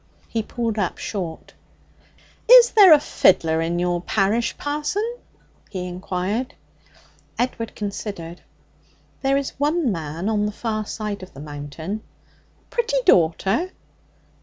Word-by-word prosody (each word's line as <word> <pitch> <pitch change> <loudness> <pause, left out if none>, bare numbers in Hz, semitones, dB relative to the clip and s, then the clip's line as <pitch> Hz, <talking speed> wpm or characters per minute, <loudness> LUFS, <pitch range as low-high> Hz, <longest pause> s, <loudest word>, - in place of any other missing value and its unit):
He 225 - -1
pulled 225 -1 -3
up 190 - -1
short. 175 -6 -5 1.0
'Is - - +9
there 400 -5 +8
any 305 - +9
fiddler 165 - +3
in 170 +1 -1
your 175 0 0
parish, 210 +5 0
parson?' 380 +11 -2 0.5
he 185 -3 -4
inquired. 185 +6 -3 0.8
Edward 235 -2 -2
considered. 200 -4 -6 0.8
'There 275 0 +2
is 280 -1 -2
one 295 -2 +1
man 165 +1 -4
on 210 -1 +1
the - - -3
far 215 -1 -3
side 210 -2 -4
of 185 - -12
the - - -10
Mountain.' 150 +7 -6 0.7
'Pretty 475 +1 0
daughter?' 195 - +3
210 Hz, 120 wpm, -22 LUFS, 175-270 Hz, 1.0 s, Is